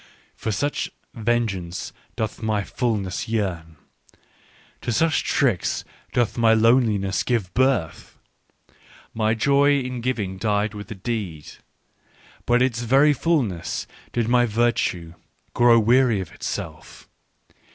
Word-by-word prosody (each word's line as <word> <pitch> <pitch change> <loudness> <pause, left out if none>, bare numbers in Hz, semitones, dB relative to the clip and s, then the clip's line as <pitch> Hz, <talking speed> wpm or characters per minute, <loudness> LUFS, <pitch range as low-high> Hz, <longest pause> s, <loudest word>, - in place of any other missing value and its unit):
" - - -35
For 110 - 0
such 145 +9 -1 0.2
vengeance 110 -7 -2 0.2
doth 110 +1 -3
my 110 -2 0
fulness 105 -5 -2
yearn: 90 -8 -2 1.1
to 120 - -2
such 160 +8 +2
tricks 120 - 0 0.3
doth 120 0 0
my 115 -1 +5
loneliness 110 -4 +3
give 110 -8 -1
birth. 125 - 0 0.5
" - - -32 0.3
My 110 0 +1
joy 140 +4 +3
in 125 -2 -4
giving 105 -7 -2
died 105 0 0
with 105 -2 -8
the 110 - -7
deed. 95 -7 -4 1.0
By 120 - +3
its 125 -1 +2
very 135 +5 +4
fulness 125 - -1 0.3
did 120 -2 -1
my 120 0 +3
virtue 105 -7 0 0.4
grow 120 -1 +5
weary 120 0 +4
of 95 - -6
itself. - - -7
115 Hz, 120 wpm, -23 LUFS, 100-125 Hz, 1.1 s, my